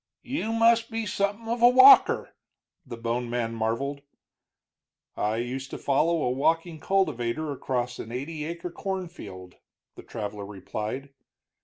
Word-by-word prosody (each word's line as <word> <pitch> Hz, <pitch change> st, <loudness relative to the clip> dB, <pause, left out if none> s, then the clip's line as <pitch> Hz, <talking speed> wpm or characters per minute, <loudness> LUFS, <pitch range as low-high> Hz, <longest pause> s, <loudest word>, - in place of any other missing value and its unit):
"You 250 Hz, -4 st, -3 dB
must 230 Hz, 0 st, +3 dB
be 225 Hz, -1 st, -3 dB
something 205 Hz, +3 st, -2 dB
of 235 Hz, +1 st, -2 dB
a 240 Hz, -, +8 dB
walker," 390 Hz, +12 st, +7 dB, 0.5 s
the 125 Hz, -6 st, -8 dB
bone 120 Hz, +1 st, -2 dB
man 120 Hz, -1 st, -2 dB
marveled. 115 Hz, +6 st, -2 dB, 1.1 s
"I 105 Hz, +1 st, 0 dB
used 130 Hz, +3 st, -4 dB
to -, -, -6 dB
follow 155 Hz, +4 st, +1 dB
a 125 Hz, -, +1 dB
walking 165 Hz, +5 st, 0 dB
cultivator 155 Hz, -6 st, 0 dB
across 125 Hz, -3 st, -3 dB
an 110 Hz, -, -7 dB
eighty 150 Hz, +5 st, -5 dB
acre 170 Hz, +2 st, -5 dB
cornfield," 175 Hz, -, -6 dB, 0.4 s
the -, -, -11 dB
traveler 105 Hz, -2 st, -6 dB
replied. 105 Hz, +7 st, -5 dB
140 Hz, 135 wpm, -26 LUFS, 120-190 Hz, 1.1 s, a